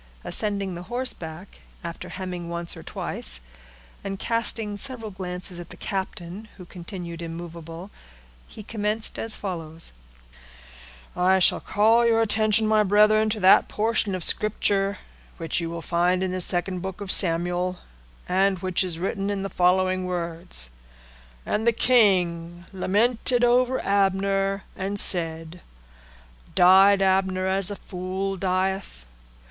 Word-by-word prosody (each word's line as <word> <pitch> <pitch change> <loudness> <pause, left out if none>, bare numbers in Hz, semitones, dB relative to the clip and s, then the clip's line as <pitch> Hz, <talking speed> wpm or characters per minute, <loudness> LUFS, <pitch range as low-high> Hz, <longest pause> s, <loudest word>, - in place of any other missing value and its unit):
Ascending 200 -3 -2
the 175 +1 -8
horseblock, 195 -8 -4 0.2
after 170 0 -7
hemming 180 -2 -6
once 170 0 -4
or - - -10
twice, - - +1 0.6
and 195 0 -4
casting 225 -1 -1
several 225 -1 -3
glances 180 -1 -6
at 175 - -9
the - - -11
captain, 190 +1 -5
who 180 - -11
continued 175 -1 -8
immovable, 165 +2 -8 0.6
he 215 - -11
commenced 215 +1 -1
as 225 -1 0
follows:— 165 -4 -5 1.2
"I 185 +1 +3
shall 185 - +3
call 225 +3 +3
your 230 -1 +3
attention, 220 0 +4
my 215 0 +3
brethren, 210 +2 +4
to 215 0 -2
that 185 +1 +6
portion 215 -2 0
of 185 - -1
Scripture 200 -1 +2 0.4
which 165 0 -1
you 165 - -3
will 170 0 -6
find 180 +2 +1
in 185 - -1
the 185 0 -1
second 180 +1 0
book 190 +1 -6
of 200 -2 -3
Samuel, 175 +1 +1 0.5
and 190 +1 +2
which 185 +1 -1
is 175 -3 -4
written 195 +3 -2
in 200 -1 -2
the 195 - -3
following 185 +1 +2
words:—'_And 65 - -7
the 235 - +5
king 175 -8 +2
lamented 230 +6 +1
over 250 +1 +3
Abner, 195 0 +1
and 200 +2 -2
said. 165 -1 +1 0.9
Died 195 +2 +6
Abner 190 -1 +1
as 190 0 +1
a 205 - -3
fool 190 +1 -4
dieth? 185 - -2
190 Hz, 130 wpm, -24 LUFS, 175-205 Hz, 1.2 s, that